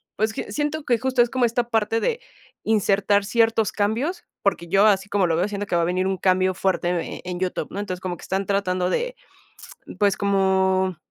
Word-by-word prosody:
pues 220 +1 0
q - - -4
siento 295 +1 -2
que 245 -4 +2
justo 260 +1 +1
es 240 - +3
como 255 -1 +1
esta 240 +1 -1
parte 225 0 +1
de 465 - -1 0.4
insertar 205 -1 +2
ciertos 225 -1 +2
cambios, 235 - -1 0.5
yo 195 +3 +4
así 195 -1 +2
como 200 -3 +2
lo 165 - +1
veo 175 +4 +1
siento 205 0 -4
que 175 - -1
va 170 - +3
a - - +1
venir 185 +2 0
un 190 0 -1
cambio 185 0 +2
fuerte 190 -1 0
en 175 -2 -3
en 180 -1 -5
YouTube, 185 -1 -2
¿no? 200 - -6
Entonces, 185 -3 -4
como 180 -2 -4
que - - -14
están 195 +1 -2
tratando 185 -2 0
de, - - -1 0.8
pues, 200 -1 +3
como, 190 -2 +1
200 Hz, 205 wpm, -23 LUFS, 185-225 Hz, 0.8 s, yo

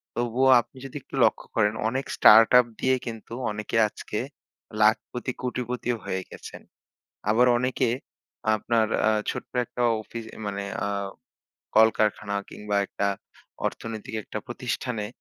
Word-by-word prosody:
তবুও 120 +2 +2
আপনি 130 - -21
যদি 135 - -10
একটু - - -11
লক্ষ্য - - +2
করেন 105 0 +3
অনেক 130 +4 -2
স্টার্টআপ 115 +3 +8
দিয়ে 130 0 +3
কিন্তু 115 -1 -7 0.2
অনেকে 105 +2 -3
আজকে - - -5 0.6
লাখপতি-কোটিপতিও 125 +2 0
হয়ে 95 - -2
গেছেন। - - -10 0.7
আবার 120 +4 +5
অনেকে 125 +1 0 0.7
আপনার 110 +1 +1 0.2
আ - - +5 0.2
ছোট্ট - - -5
একটা 125 0 -6 0.2
অফি 115 +2 -8 0.3
মানে 100 -1 -3
অ্যা 100 - -1 0.9
কলকারখানা 110 -2 +3 0.2
কিংবা 105 -1 -3
একটা 100 - -2 0.6
অর্থনৈতিক 110 -1 -5
একটা - - -6
প্রতিষ্ঠানে 115 -5 -3
115 Hz, 120 wpm, -26 LUFS, 105-125 Hz, 0.9 s, স্টার্টআপ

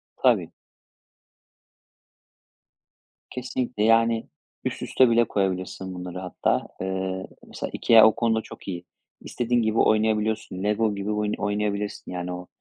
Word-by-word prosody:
Tabii. - - +2 2.8
Kesinlikle, 125 -3 -3
yani, 115 0 +3 0.3
üst - - -3
üste 130 -2 +3
bile 115 0 +5
koyabilirsin 95 -2 -2
bunları 90 0 -6
hatta, 90 -2 -1
eee, 95 0 -3 0.2
mesela - - -5
IKEA 115 -1 +7
o 110 - +2
konuda 115 -1 +1
çok - - -13
iyi. 90 -2 -5 0.4
İstediğin 120 0 0
gibi 110 0 0
oynayabiliyorsun, 110 -3 +1
LEGO 105 0 +1
gibi 100 +1 -3
oyun 105 0 -1
oynayabilirsin, 105 0 -2
yani, 90 0 -4
o 90 0 -7
105 Hz, 120 wpm, -25 LUFS, 95-115 Hz, 2.8 s, IKEA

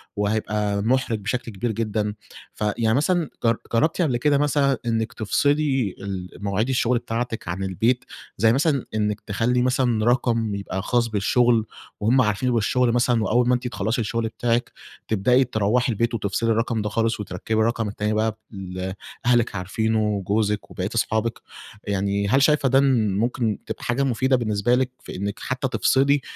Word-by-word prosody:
وهيبقى 105 0 -1
مُحرِج 120 -1 +1
بشكل 120 +4 -3
كبير 110 +4 -2
جدًا، 105 -1 -1 0.4
فيعني 110 +1 0
مثلًا 170 +1 +1
جر 115 0 +3 0.2
جرّبتِ 155 +10 +2
قبل 140 -8 +1
كده 145 +3 +2
مثلًا 145 -2 +2
إنِّك 115 0 -1
تفصلي 135 -1 +1
المواعيد 100 +3 -3
الشغل 125 -1 +2
بتاعتِك 115 -2 -4
عن 90 +3 -3
البيت، 115 +7 0 0.3
زي 110 +3 +4
مثلًا 140 -1 +1
إنِّك 105 -1 -1
تخلّي 120 +4 0
مثلًا 125 -3 +1
رقم 115 -3 +1
يبقى 100 -1 -4
خاص 120 +2 +1
بالشغل، 115 +2 +2 0.3
وهُم 120 +5 +3
عارفين 115 +3 +1
بالشغل 120 +2 +2
مثلًا 120 -1 +2
وأوّل 120 +3 +2
ما 125 - +4
أنتِ 125 0 -3
تخلّصي 120 0 -1
الشغل 115 0 -1
بتاعِك، 115 +2 -1 0.4
تبدأي 125 +5 +3
تروّحي 120 +1 +1
البيت 115 +2 0
وتفصلي 110 +1 -1
الرقم 115 0 0
ده 105 - -2
خالص 115 +1 0
وتركّبي 105 +2 -3
الرقم 115 0 +1
التاني 105 +1 -2
بقى، 110 +1 +1
ب 110 - -19 0.2
اللي 95 -1 -5 0.3
أهلِك 120 -3 +2
عارفينه 110 +4 -1
وجوزِك 105 0 -1
وبقيّة 95 +1 -3
أصحابِك، 110 0 0 0.5
يعني 100 0 0
هل 135 +7 +3
شايفة 145 -2 +3
ده 135 +2 +5
ن 115 -8 +2
ممكن 115 -2 0
تبقى - - -6
حاجة 125 +3 0
مفيدة 130 +1 +2
بالنسبة 110 -1 +1
لِك 130 0 0
في - - -8
إنِّك 100 +2 -4
حتّى 130 +1 -2
تفصلي 140 +1 +3
115 Hz, 160 wpm, -23 LUFS, 105-125 Hz, 0.5 s, ده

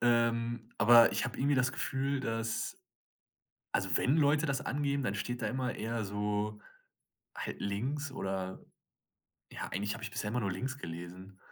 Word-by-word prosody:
ähm, 115 -1 +2
aber 115 +1 +8
ich - - 0
habe 120 - -6
irgendwie 140 +2 +3
das 130 0 +2
Gefühl, 135 +1 -1
dass 115 -2 -2 1.0
also 95 -3 +2
wenn 135 +5 +3
Leute 150 +1 +4
das 135 -2 0
angeben, 140 0 0
dann 105 -5 0
steht 120 +4 -3
da - - 0
immer 130 -1 -1
eher 115 0 -2
so 105 +1 -1 0.8
halt - - -5
links 135 +8 -2
oder 95 -5 -3 0.9
ja, - - -4
eigentlich 100 +1 -1
habe 120 - -7
ich 115 - -4
bisher 105 - -3
immer 125 - 0
nur 100 -4 0
links 130 +9 -3
gelesen. 90 +1 -8
115 Hz, 160 wpm, -32 LUFS, 105-130 Hz, 1.0 s, aber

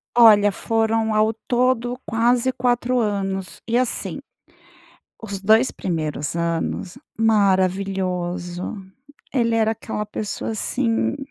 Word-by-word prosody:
Olha, 210 -4 +7
foram 225 +1 0
ao 215 +1 +3 0.2
todo 245 0 +1
quase 240 +3 +2
4 245 0 0
anos 195 -4 -2
e 235 +1 +1
assim. 255 -1 -1 1.0
Os 200 -3 -5
2 220 +5 +4
primeiros 155 -3 -3
anos, 170 +4 -2 0.2
maravilhoso, 185 -4 0 0.6
ele 235 -3 +1
era 220 -1 +2
aquela 215 -1 -4
pessoa, 210 0 -4
assim, 230 +4 0
215 Hz, 100 wpm, -22 LUFS, 190-235 Hz, 1.0 s, Olha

